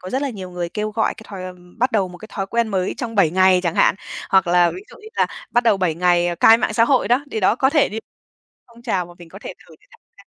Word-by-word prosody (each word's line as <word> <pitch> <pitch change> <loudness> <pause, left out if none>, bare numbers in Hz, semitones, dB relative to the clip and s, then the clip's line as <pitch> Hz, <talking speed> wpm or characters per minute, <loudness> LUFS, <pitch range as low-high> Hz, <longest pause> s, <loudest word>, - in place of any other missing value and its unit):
có 185 - -8
rất 265 +2 -1
là 280 - -2
nhiều 190 -5 -8
người 175 -1 -4
kêu 210 +4 -4
gọi 220 +1 -1
cái 220 - -13
thói 195 -2 -8 0.4
bắt 250 +2 +1
đầu 200 -4 +1
một 180 0 -12
cái 215 - -12
thói 195 - -3
quen 235 +2 -1
mới 190 -3 -2
trong 240 -4 -5
7 195 -7 +3
ngày 185 +1 +4
chẳng 170 -2 -1
hạn, - - +3 0.4
hoặc 190 -1 +4
là 175 0 +3
ví 375 - -9
dụ - - -14
như 435 - -11
là - - +3 0.2
bắt 240 - +1
đầu 225 -3 +4
7 180 -4 0
ngày 175 0 +1
cai 225 +1 +7
mạng 220 - -1
xã 230 - +4
hội 260 +1 +1
đó, 250 +4 +2
thì 220 - -2
đó 195 +3 +2
có 265 +1 +2
thể 300 -1 +3
đi 215 - -5 0.7
phong 235 0 -18
trào 195 -7 -1
mà 175 - -14
mình 170 -1 -13
có 195 - -12
thể - - -8
thử - - -16
để - - -28
tham 470 - -20 0.2
gia, - - -17
200 Hz, 295 wpm, -20 LUFS, 180-235 Hz, 0.7 s, cai